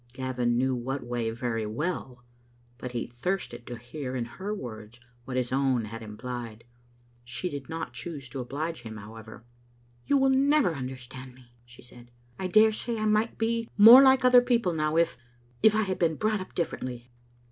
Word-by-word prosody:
Gavin 125 -2 -1
knew 130 +1 +1
what 130 +3 -3
way 120 -2 -2
very 115 -2 -3
well, 125 0 -4 0.6
but 125 -1 -6
he 120 - -2
thirsted 120 -2 -4
to 120 - -6
hear 130 +2 -6
in 120 -2 -2
her 190 - -6
words 115 - -7 0.3
what 130 0 -4
his 125 -1 -1
own 130 -3 +1
had 115 +2 -8
implied. 115 +1 -7 0.6
She 120 +9 -4
did 140 -2 -7
not 160 -6 -5
choose 135 +2 -7
to 135 - -6
oblige 150 +5 -4
him, 110 -2 -8
however. 110 +2 -11 0.3
" 120 0 -34
You 285 - +4
never 270 - +3
will 160 - -6
understand 130 0 -8
me," 125 -2 -20
she 120 +1 -14
said. 120 0 -15 0.2
" 120 0 -31
I 190 - -2
dare 215 +3 +5
say 230 +2 -3
I 215 - -1
might 215 +2 +1
be 230 0 -1
more 230 +5 +11
like 265 -1 +5
other 250 -1 +8
people 235 -7 +1
now, 155 0 0
if 170 -6 +1 0.2
— 120 0 -32
^if 220 -1 +6
I 220 - +3
had 185 -2 -3
been 165 -3 +2
brought 215 +4 0
up 185 - -10
differently. 125 -7 -4
130 Hz, 190 wpm, -28 LUFS, 120-185 Hz, 0.6 s, more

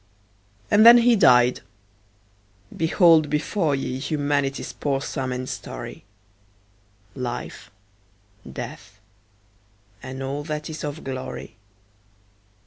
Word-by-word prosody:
And 205 +1 +6
then 235 +1 +10
he 240 0 +4
died! 125 - +5 1.2
Behold 165 -2 +4
before 150 +1 0
ye 130 -1 -4
Humanity's 145 -2 -2
poor 140 -2 -1
sum 135 -2 -4
and 125 0 -4
story; - - -8 1.1
Life, 125 -2 -6 0.8
Death, - - -9 1.0
and 130 +1 -7
all 140 +2 -4
that 150 0 -5
is 155 - -7
of 150 +1 -5
glory. 130 -1 -7
145 Hz, 95 wpm, -23 LUFS, 130-160 Hz, 1.2 s, then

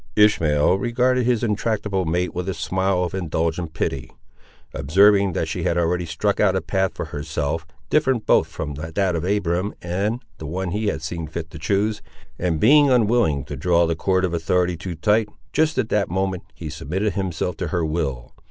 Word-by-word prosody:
Ishmael 90 -5 +4
regarded 125 +1 +1
his 120 -3 +1
intractable 105 -3 -1
mate 90 +3 -1
with 90 +2 -3
a 95 - -2
smile 95 0 0
of 90 - -3
indulgent 85 -2 -2
pity. 70 -5 -2 0.6
Observing 100 +5 +4
that - - -1
she - - -3
had 85 - 0
already 85 0 0
struck 100 +6 -1
out 95 -3 +3
a 95 - +1
path 95 -1 -1
for - - -4
herself, 80 +2 -3 0.2
different 130 -7 +2
both - - +4
from 75 -2 -5
that 85 +5 -1
of 80 - -2
Abiram 95 0 0
and 100 +7 -2 0.2
the 80 - -6
one 90 +3 -3
he 105 +3 -1
had 80 - -2
seen 80 +1 -4
fit 80 +1 -6
to 80 - -9
choose, 105 +5 0 0.4
and 85 -3 0
being 145 - +6
unwilling 110 - +2
to - - -6
draw 85 -1 +2
the 85 0 0
cord 95 +3 +1
of 90 - -3
authority 90 +1 +1
too 85 +2 -6
tight, 105 +5 +2 0.2
just 160 +1 +2
at 110 - 0
that 105 -1 +1
moment, 95 +1 -2
he 80 - -7
submitted 90 +7 -2 0.4
to - - -3
her 85 -3 -1
will. 75 -6 -3
90 Hz, 185 wpm, -22 LUFS, 80-105 Hz, 0.6 s, being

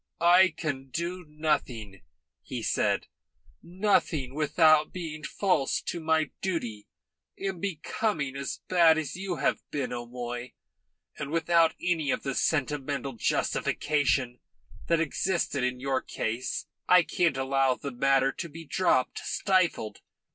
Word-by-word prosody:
"I 180 +2 +6
can 135 -4 -3
do 175 +5 -3
nothing," 130 -10 -2 0.4
he - - -6
said, - - +1 0.6
"nothing 170 -7 0
without 155 +1 +4
being 160 -4 -6
false 180 -9 +1
to 175 - -3
my 160 -1 +1
duty 120 - -3 0.5
and 190 -3 -4
becoming 165 -5 -2
as 140 0 -4
bad 170 -3 +5
as 155 -3 -3
you 185 -1 -3
have 145 -2 +1
been, 135 -4 -3
O'Moy, 120 0 -5 0.7
and 145 - -4
without 165 +1 +3
any 165 -5 0
of - - 0
the 135 - -2
sentimental 140 -2 -1
justification 135 +2 0 0.5
that 170 -1 +3
existed 165 -3 0
in 125 0 -1
your 135 0 0
case. 115 +3 -3 0.2
I 180 -1 +7
can't 165 -4 +1
allow 135 -1 +2
the 140 - -6
matter 135 +2 +3
to 170 +4 -6
be 165 +2 -10
dropped, 140 -6 +1
stifled. 170 - 0
150 Hz, 125 wpm, -28 LUFS, 135-170 Hz, 0.7 s, I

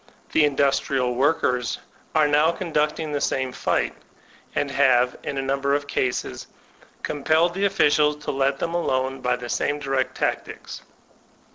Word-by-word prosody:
The 155 - +4
Indus 140 -1 +2
trial 125 -2 -1
Workers 125 -2 +1 0.4
are 155 -1 +5
now 150 +3 +4
conducting 155 -3 -1
the 145 -1 -1
same 130 -1 0
fight, - - 0 0.6
and 145 -1 0
have, 130 -2 +3
in 140 - -4
a 135 - -1
number 140 +1 +1
of 145 0 -2
cases, 125 - -2 0.6
compelled 160 +4 +2
the 195 +2 0
officials 150 -5 +3
to - - -1
let 135 0 +1
them 165 - -3
alone 135 -5 -1
by 125 0 +1
the 125 -1 -7
same 145 +4 0
direct 135 -2 -1
tactics. - - -3
140 Hz, 150 wpm, -24 LUFS, 130-150 Hz, 0.6 s, are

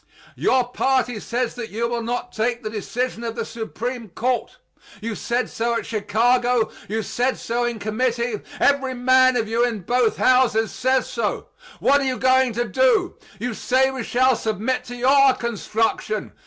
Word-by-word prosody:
Your 255 -2 +2
party 250 -3 0
says 240 +2 -2
that 240 -2 -6
you 230 +3 -2
will 235 0 -2
not 245 +1 -3
take 235 +2 -1
the 215 - -4
decision 235 +3 -3
of 230 -1 -4
the 230 -2 -3
Supreme 235 0 -5
Court. 245 +7 -2 0.4
You 225 +1 -4
said 240 +3 -1
so 235 +1 -1
at 230 - -2
Chicago; 235 +3 +1 0.2
you 220 +1 -1
said 250 +5 -1
so 240 +1 -2
in 240 -1 -2
committee; 235 +1 -1 0.2
every 270 -2 +2
man 255 0 +4
of 225 -2 -1
you 230 +2 +1
in 235 -4 -1
both 240 +4 +1
Houses 250 -4 +3
says 260 +2 +1
so. - - -3 0.3
What 280 +1 +4
are - - -1
you 260 -1 -1
going 260 -1 +3
to 240 +2 -1
do? 450 -8 +2 0.2
You 240 +3 -3
say 260 +4 +2
we 265 -1 -5
shall 255 +2 +3
submit 220 +4 -2
to 245 - -7
your 270 +2 +4
construction. 220 -2 -2
240 Hz, 170 wpm, -22 LUFS, 225-255 Hz, 0.4 s, man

